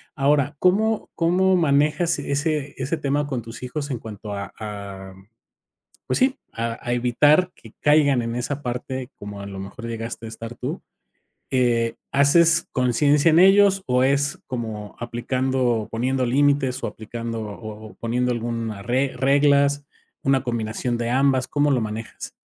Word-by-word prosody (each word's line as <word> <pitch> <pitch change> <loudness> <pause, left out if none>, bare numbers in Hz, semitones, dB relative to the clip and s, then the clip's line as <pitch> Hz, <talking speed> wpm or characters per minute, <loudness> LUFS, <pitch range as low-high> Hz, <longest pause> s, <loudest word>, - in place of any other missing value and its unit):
Ahora, 145 0 +2
¿cómo 215 +4 +2
cómo 185 +3 +3
manejas 155 +2 +2
ese 145 0 -1
ese 135 +5 -2
tema 145 0 -1
con 130 -4 -3
tus 115 +2 -10
hijos 140 +3 -4
en 120 - -3
cuanto 105 -2 -8
a 100 0 -6
a 100 -3 -7 0.9
pues - - 0
sí, 265 +1 +3 0.2
a 115 0 -3
a 120 - 0
evitar 145 +9 +3
que 115 - -16
caigan 145 -4 +4
en 115 0 -3
esa 140 +4 -3
parte 130 +1 -4
como 100 0 -8
a 100 - -7
lo 100 -1 -7
mejor 110 +5 -8
llegaste 115 0 -5
a - - -6
estar 115 +1 -8
tú?, - - -5 0.7
eh, 120 -3 +2 0.2
¿haces 165 +4 +4
conciencia 140 +5 +3
en 160 - +5
ellos 195 +1 +6
o 125 0 +2
es 140 +2 +1
como 110 -4 -5
aplicando 130 +2 -1
o 115 -3 0
poniendo 130 +3 0
límites 135 0 +2
o - - -1
aplicando 115 +1 -6
o 110 +1 -8
o - - -16
poniendo 125 +2 0
alguna 115 -3 -3
re 130 +5 0
reglas, 140 +1 +3 0.4
una 135 -1 +2
combinación 120 0 -2
de 120 0 -2
ambas? 130 0 +2
¿Cómo 145 0 +1
lo 130 -3 +2
manejas? 110 +1 -5
130 Hz, 160 wpm, -23 LUFS, 115-145 Hz, 0.9 s, ellos